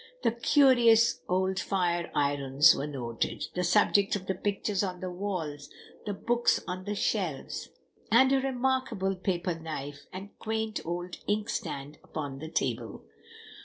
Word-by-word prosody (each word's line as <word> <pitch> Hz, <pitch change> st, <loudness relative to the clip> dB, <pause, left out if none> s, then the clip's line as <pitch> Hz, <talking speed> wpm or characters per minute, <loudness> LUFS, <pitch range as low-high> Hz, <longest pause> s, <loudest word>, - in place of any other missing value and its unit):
The -, -, +3 dB
curious 235 Hz, -2 st, +5 dB
old 190 Hz, +1 st, +1 dB
fire 175 Hz, -3 st, 0 dB
irons 140 Hz, 0 st, +4 dB
were 145 Hz, -, -3 dB
noted, 120 Hz, -5 st, -3 dB
the 180 Hz, -, -1 dB
subjects 200 Hz, +3 st, +3 dB
of 190 Hz, -2 st, -5 dB
the 190 Hz, -, 0 dB
pictures 200 Hz, +1 st, -1 dB
on 185 Hz, -3 st, -3 dB
the 185 Hz, 0 st, -4 dB
walls, 165 Hz, -7 st, -4 dB, 0.4 s
the 205 Hz, -, -1 dB
books 240 Hz, +3 st, +2 dB
on 185 Hz, 0 st, -5 dB
the 205 Hz, 0 st, -2 dB
shelves, 180 Hz, -, -2 dB, 0.4 s
and 260 Hz, +4 st, +6 dB
a 270 Hz, -1 st, +3 dB
remarkable 260 Hz, -7 st, 0 dB
paper 180 Hz, -1 st, -1 dB
knife 150 Hz, -3 st, -7 dB
and 195 Hz, +2 st, -8 dB
quaint 220 Hz, -1 st, -2 dB
old 175 Hz, +1 st, -4 dB
inkstand 205 Hz, -9 st, -3 dB
upon 140 Hz, -3 st, -5 dB
the 160 Hz, +2 st, -7 dB
table. -, -, -2 dB
185 Hz, 140 wpm, -29 LUFS, 160-215 Hz, 0.4 s, and